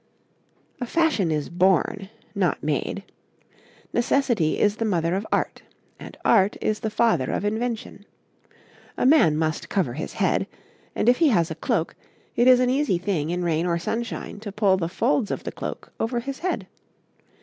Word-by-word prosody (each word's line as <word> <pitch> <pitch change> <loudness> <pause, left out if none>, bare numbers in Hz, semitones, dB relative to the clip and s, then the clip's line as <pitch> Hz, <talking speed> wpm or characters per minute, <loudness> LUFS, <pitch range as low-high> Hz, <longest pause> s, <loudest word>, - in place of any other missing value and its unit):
A 245 - -3
fashion 310 - +2
is 150 -2 -1
born, 190 +2 +1 0.2
not 190 -6 0
made. 155 +6 -2 0.9
Necessity 240 - +1
is 210 +1 +2
the 230 - -1
mother 175 -6 0
of 195 +3 -2
Art, - - -1 0.4
and - - -10
Art 200 -3 +4
is 215 0 -1
the 220 - -2
father 215 - +2
of 205 - -2
Invention. 220 -1 -3 0.9
A - - 0
man 255 - +5
must 155 -1 -2
cover 165 -12 0
his 155 - -5
head, - - +1 0.5
and - - 0
if 245 - +6
he 330 - +4
has 175 -8 +2
a - - -3
cloak, - - -1 0.4
it 240 - +3
is 255 -1 +7
an 250 0 +2
easy 270 -8 +1
thing 175 -4 -2
in 175 +1 -1
rain 170 0 0
or 170 -1 +1
sunshine 225 +4 -4
to 210 -1 -7
pull 200 -1 +3
the 170 -3 -2
folds 175 +2 +1
of - - -3
the - - -4
cloak - - -7
over 235 +2 -1
his 270 +3 -6
head. 365 +1 -2
205 Hz, 170 wpm, -24 LUFS, 170-235 Hz, 0.9 s, is